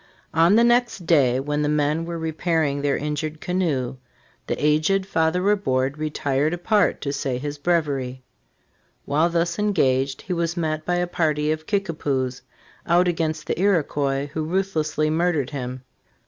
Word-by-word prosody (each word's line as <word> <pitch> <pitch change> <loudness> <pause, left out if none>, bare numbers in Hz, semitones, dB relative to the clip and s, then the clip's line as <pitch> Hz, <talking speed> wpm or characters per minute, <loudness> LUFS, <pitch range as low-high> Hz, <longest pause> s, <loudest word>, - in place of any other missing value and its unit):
On 165 +5 +5
the 230 - +5
next 240 -6 +2
day, 135 -7 +3
when 145 +2 -1
the 150 - +1
men 150 +2 +1
were 170 0 -4
repairing 160 -3 0
their 140 -1 +1
injured 150 +1 -3
canoe, 155 -10 -1 0.5
the - - 0
aged 155 +6 +2
Fathej 180 0 +1
Ri 205 +1 +4
bourde 135 -6 -1
retired 150 0 0
apart 205 +4 +1
to 140 -1 -2
say 135 -2 -2
his 145 +2 -5
breviary. 140 -6 -1 0.8
While 155 +4 +2
thus 170 +2 0
engaged, 135 -10 +1
he 185 - -3
was 170 0 -1
met 155 -2 -2
by 175 - +1
a 175 0 +1
party 155 -3 0
of 155 0 -4
Kickapoos, 145 -10 -1 0.5
out 175 +2 +4
against 160 -2 -1
the - - -2
Iroquois, 145 -7 +1
who 155 - -2
ruthlessly 155 -3 0
murdered 160 -4 0
him. 130 -2 -5
155 Hz, 155 wpm, -23 LUFS, 145-175 Hz, 0.8 s, On